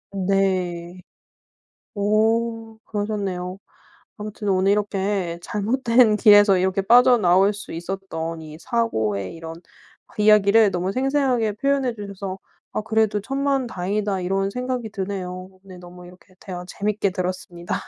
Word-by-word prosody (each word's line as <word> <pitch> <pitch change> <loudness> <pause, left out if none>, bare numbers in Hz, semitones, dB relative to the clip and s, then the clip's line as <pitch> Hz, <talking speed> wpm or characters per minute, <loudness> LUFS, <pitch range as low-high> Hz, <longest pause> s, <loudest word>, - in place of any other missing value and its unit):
음 190 -1 -2
네. 185 -2 -1 0.9
오 225 +2 0
그러셨네요. 200 -3 -3 0.6
아무튼 210 -1 -6
오늘 190 0 +2
이렇게 195 -4 -1
잘못된 230 +3 +2
길에서 205 -2 +6
이렇게 190 +1 +1
빠져나올 210 -4 +5
수 205 0 -9
있었던 165 -2 -5
이 155 0 -10
사고의 110 - -1
이런 165 0 -8 0.6
이야기를 210 0 +5
너무 185 +1 -2
생생하게 260 -3 +1
표현해 270 +1 0
주셔서 200 -2 -6 0.3
아 - - -1
그래도 220 -1 +1
'천만다행이다.' 215 -6 -1
이런 195 +2 -1
생각이 250 0 -4
드네요. 185 -2 -6
네 185 -2 -12
너무 180 0 -12
이렇게 180 +1 -18
대화 180 -2 -7
재밌게 205 +2 -1
들었습니다. 180 -1 -4
200 Hz, 300 characters per minute, -22 LUFS, 185-220 Hz, 0.9 s, 길에서